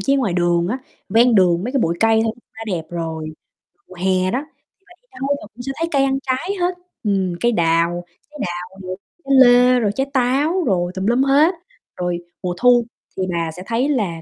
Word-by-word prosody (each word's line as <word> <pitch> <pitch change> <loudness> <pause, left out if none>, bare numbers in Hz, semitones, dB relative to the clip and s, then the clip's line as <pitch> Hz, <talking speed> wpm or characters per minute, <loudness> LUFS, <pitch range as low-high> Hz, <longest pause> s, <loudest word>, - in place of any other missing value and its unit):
chí 275 +8 +2
ngoài 230 -10 0
đường 175 -1 +1
á, 250 +6 -2 0.3
ven 230 +4 +4
đường 180 -2 +3
mấy 250 - -3
cái 275 - +1
bụi 170 +1 0
cây 225 0 +4
thôi 225 - 0 0.2
đã 225 - -8
đẹp 180 -6 -2
rồi. 165 -2 -4 0.6
Mùa - - -13
hè 185 0 +1
đó, 255 +4 -1
thì - - -45 0.3
bà - - -26
đi - - -41
đâu 275 - -1
bà - - -10
cũng 240 - -10
sẽ 270 - -3
thấy 330 - 0
cây 275 -2 +3
ăn 270 0 +1
trái 265 +7 -2
hết, 355 0 0 0.3
ừm, 195 -4 0
cây 240 - +3
đào, 170 -2 +1 0.3
trái 300 0 -13
đào, 180 +2 -6
rồi 185 0 -6 0.3
trái 275 - +1
lê, 250 0 +6
rồi 210 -3 +1
trái 270 +1 -1
táo 280 +8 +1
rồi 180 -5 0
tùm 190 0 -3
lum 240 +3 +3
hết. 290 +6 +4 0.4
Rồi 175 -1 -1 0.3
mùa 180 -1 -1
thu 245 +1 +5 0.3
thì 190 - -1
bà 165 -2 -2
sẽ 180 +3 -9
thấy 240 +5 0
là 200 - -1
220 Hz, 220 wpm, -20 LUFS, 175-260 Hz, 0.6 s, lê